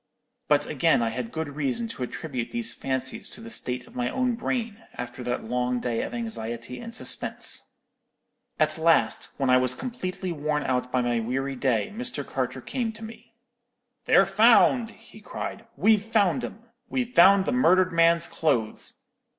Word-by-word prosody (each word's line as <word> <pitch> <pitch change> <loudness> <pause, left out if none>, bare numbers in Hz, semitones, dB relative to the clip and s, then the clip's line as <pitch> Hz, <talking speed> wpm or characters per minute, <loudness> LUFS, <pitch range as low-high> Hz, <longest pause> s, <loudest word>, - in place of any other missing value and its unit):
But - - +3
again - - +2
I 115 - +1
had 115 0 -5
good 160 -2 -3
reason 150 - -1
to 225 - -6
attribute 125 -1 -4
these 235 -1 -2
fancies 130 -1 -3
to - - -7
the 230 +1 -9
state 125 - -2
of - - -18
my 125 0 -1
own 255 - 0
brain, 230 -2 -3
after 125 +1 -6
that 125 0 -2
long 125 +1 -1
day 120 -2 -1
of - - -4
anxiety 125 - -5
and 230 -1 -8
suspense. 235 - -2 0.8
"At 155 0 +1
last, 165 0 +2
when 135 -2 +1
I 130 - +7
was 130 0 +1
completely 190 -7 -4
worn 150 -1 -1
out 125 -1 -1
by 125 -1 +1
my 120 -1 +1
weary 135 +4 -2
day, 125 - 0
Mr. 245 +2 -3
Carter - - -3
came 240 -4 -2
to 225 +1 -11
me. 225 +1 -11 0.7
"'They're 195 - +6
found!' 225 +4 +5
he 225 -1 -16
cried. 225 +2 -6
'We've 215 0 +4
found 205 -5 +2
'em! 225 - -7 0.3
We've 250 -1 -2
found 190 +2 +7
the - - 0
murdered 185 -7 +4
man's 170 0 +4
clothes! 120 -9 -2
165 Hz, 170 wpm, -26 LUFS, -, 0.8 s, I